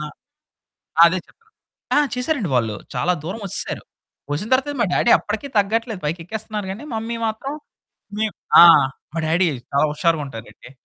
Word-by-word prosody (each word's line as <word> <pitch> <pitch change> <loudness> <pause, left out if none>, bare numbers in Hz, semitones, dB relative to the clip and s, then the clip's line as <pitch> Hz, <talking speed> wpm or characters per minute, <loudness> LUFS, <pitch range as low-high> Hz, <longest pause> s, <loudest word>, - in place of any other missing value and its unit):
నా 150 - -4 1.0
అదే 175 +2 +4
చెప్తున్నా. 445 -1 -28 0.4
ఆ! - - +6 0.2
చేసారండి 250 - -1
వాళ్ళు 110 -3 0 0.2
చాలా 180 - +1
దూరం 200 +7 -5
వచ్చేసారు. - - -4 0.5
వచ్చిన 195 +10 -3
తర్వాతే 270 +3 +2
మా - - +4
డ్యాడీ 240 - +2
అప్పటికి 220 +7 -5
తగ్గట్లేదు 220 0 0
పైకెక్కేస్తున్నారు 205 +6 -4
గాని, 220 +9 -9
మమ్మీ 225 +1 -3
మాత్రం 245 +6 -4 0.7
మేం 220 -1 0 0.3
ఆ! - - +12 0.5
మా - - -1
డ్యాడీ 170 +3 +2 0.2
చాలా 140 +2 +3
హుషారుగా 155 0 +1
ఉంటారండి. 115 -1 -11
205 Hz, 145 wpm, -21 LUFS, 165-230 Hz, 1.0 s, ఆ